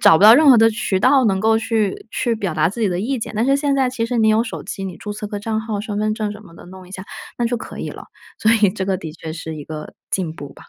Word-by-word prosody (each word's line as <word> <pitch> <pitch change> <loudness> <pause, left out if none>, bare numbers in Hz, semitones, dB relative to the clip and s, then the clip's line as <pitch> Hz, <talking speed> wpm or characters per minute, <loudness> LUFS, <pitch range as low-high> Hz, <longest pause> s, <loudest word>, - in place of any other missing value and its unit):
找 160 - +7
不 195 - 0
到 215 +2 +10
任 300 +1 +5
何 255 - +9
的 225 0 +5
渠 195 -3 -1
道 265 +4 +4
能 190 -3 +1
够 220 +1 +3
去 225 -2 -1
去 240 - 0
表 195 -7 -3
达 155 +1 +2
自 230 +5 -7
己 215 - +2
的 180 -1 -2
意 255 +5 -1
见。 220 - -5
但 220 +3 +1
是 275 +1 +3
现 280 -1 0
在 265 -2 +1
其 230 -3 -2
实 245 0 -2
你 220 -1 +3
有 220 +2 +3
手 - - -6
机， 195 - -6
你 185 -2 -6
注 210 - -6
册 210 0 -6
个 205 0 -5
账 220 0 -2
号， 220 -2 -4
身 210 -2 -4
份 215 0 0
证 215 -2 -2
儿 - - -5
什 210 +1 -9
么 170 -3 -15
的 - - -13
弄 185 0 -12
一 185 - -15
下， 190 0 -7 0.3
那 240 - -1
就 240 +1 0
可 - - -8
以 - - -4
了， - - -10 0.3
所 220 +1 +3
以 210 -4 +4
这 190 - -4
个 190 -1 +1
的 160 -4 -8
确 160 -1 -8
是 160 -1 -6
一 145 - -8
个 155 -1 -8 0.2
进 175 -5 -1
步 145 -3 -10
吧。 - - -17
215 Hz, 350 characters per minute, -20 LUFS, 190-230 Hz, 0.3 s, 到